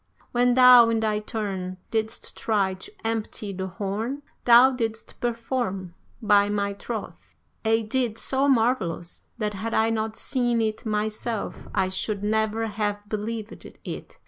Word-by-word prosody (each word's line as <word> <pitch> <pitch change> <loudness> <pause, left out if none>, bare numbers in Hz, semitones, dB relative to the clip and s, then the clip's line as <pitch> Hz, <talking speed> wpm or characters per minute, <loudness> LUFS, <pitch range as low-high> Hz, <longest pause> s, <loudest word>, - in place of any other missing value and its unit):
When 245 0 +3
thou, 250 -2 +9
in 225 -1 +1
thy 215 -1 +1
turn, 195 -4 -4
didst 220 -1 -2
try 200 -4 +1
to 185 - -10
empty 220 -2 -3
the 190 0 -4
horn, 210 +9 -3 0.2
thou 245 +2 +8
didst 225 -3 -4
perform, 230 -6 -2 0.3
by 205 -1 +5
my 200 -1 0
troth, 220 +2 -7 0.3
a 225 0 +2
deed 230 0 -1
so 270 +3 +1
marvellous, 225 - 0
that 210 -3 -2
had 220 +3 -3
I 225 +1 +3
not 220 -1 -2
seen 240 -2 0
it 220 0 -1
myself 215 +1 -3
I 185 - +2
should 200 +2 -3
never 220 +1 +1
have 205 -1 -3
believed 215 +1 -4
it. - - -9
220 Hz, 145 wpm, -25 LUFS, 205-230 Hz, 0.3 s, thou